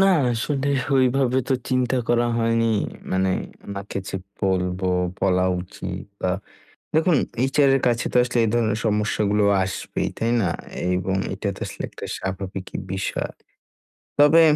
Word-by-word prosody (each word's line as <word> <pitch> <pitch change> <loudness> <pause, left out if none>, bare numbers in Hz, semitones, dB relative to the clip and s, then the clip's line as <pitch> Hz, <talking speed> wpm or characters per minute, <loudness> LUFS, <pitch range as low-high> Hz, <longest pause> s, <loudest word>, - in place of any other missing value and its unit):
না 195 - +6 0.3
আসলে 135 +4 -1 0.3
ওইভাবে 130 0 +3
তো 135 - +3
চিন্তা 130 0 +1
করা 120 0 +3
হয়নি, 115 0 +2 0.5
মানে 95 0 +2 0.4
ওনাকে 100 0 -5
যে - - -3 0.2
বলবো, 95 -1 0 0.3
বলা 90 -1 +3 0.2
উচিত 90 - -6 0.2
বা 90 - +1 0.6
দেখুন 160 +2 +4 0.4
HR 145 -1 +5
এর 135 - +1
কাছে 120 -1 +1
তো - - +4
আসলে 120 0 -2
এই 110 - +1
ধরনের 115 -2 +2
সমস্যাগুলো 105 -1 +2 0.2
আসবেই, 95 - -3
তাই 115 +1 0
না? 90 - +1 0.5
এবং 95 +1 -1 0.2
এটা 100 +2 -4
তো - - -12
আসলে - - -6
একটা - - -8
স্বাভাবিকই 95 0 -5 0.2
বিষয়। 95 - -2 0.9
তবে 150 +3 +7
110 Hz, 140 wpm, -23 LUFS, 95-125 Hz, 0.9 s, তবে